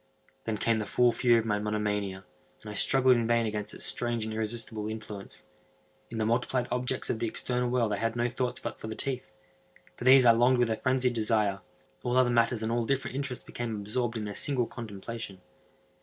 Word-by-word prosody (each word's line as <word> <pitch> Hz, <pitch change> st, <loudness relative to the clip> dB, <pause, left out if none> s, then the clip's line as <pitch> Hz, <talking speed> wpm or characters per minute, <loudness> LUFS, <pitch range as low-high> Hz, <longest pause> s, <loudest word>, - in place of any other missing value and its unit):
Then 110 Hz, -1 st, -1 dB
came 115 Hz, +1 st, +1 dB
the 105 Hz, -, -3 dB
full 125 Hz, +2 st, +4 dB
fury 120 Hz, 0 st, +4 dB
of 115 Hz, -, 0 dB
my 105 Hz, -2 st, 0 dB
monomania, 105 Hz, -2 st, -2 dB, 0.4 s
and 105 Hz, -, -7 dB
I -, -, -6 dB
struggled 130 Hz, +3 st, +4 dB
in 115 Hz, -1 st, 0 dB
vain 115 Hz, 0 st, +3 dB
against 105 Hz, -1 st, -3 dB
its -, -, -4 dB
strange 120 Hz, -2 st, -1 dB
and 110 Hz, -, -4 dB
irresistible 110 Hz, -1 st, -2 dB
influence. 110 Hz, -2 st, -8 dB, 0.6 s
In 115 Hz, -, -6 dB
the 110 Hz, -, 0 dB
multiplied 120 Hz, +2 st, 0 dB
objects 125 Hz, +1 st, -1 dB
of 110 Hz, -, -3 dB
the 115 Hz, -, 0 dB
external 125 Hz, +2 st, -1 dB
world 120 Hz, -4 st, +1 dB
I -, -, -1 dB
had 115 Hz, +2 st, -1 dB
no 120 Hz, 0 st, +1 dB
thoughts 125 Hz, 0 st, -2 dB
but -, -, -6 dB
for -, -, -7 dB
the 110 Hz, -, -5 dB
teeth. 130 Hz, 0 st, -4 dB, 0.6 s
For -, -, -8 dB
these 130 Hz, 0 st, +7 dB
I 115 Hz, -, +9 dB
longed 120 Hz, +3 st, +4 dB
with 120 Hz, -2 st, +2 dB
a 110 Hz, -, 0 dB
phrenzied 130 Hz, -1 st, +1 dB
desire. 110 Hz, -3 st, +1 dB, 0.4 s
All 125 Hz, +1 st, +1 dB
other 125 Hz, -1 st, +4 dB
matters 115 Hz, -1 st, +2 dB
and 110 Hz, -, -1 dB
all 120 Hz, 0 st, +1 dB
different 135 Hz, +3 st, -1 dB
interests 140 Hz, -2 st, -3 dB
became 120 Hz, -2 st, -4 dB
absorbed 115 Hz, +3 st, -2 dB
in 110 Hz, -, -3 dB
their 105 Hz, -, -5 dB
single 130 Hz, +2 st, +2 dB
contemplation. 110 Hz, -2 st, -7 dB
115 Hz, 210 wpm, -29 LUFS, 110-125 Hz, 0.6 s, I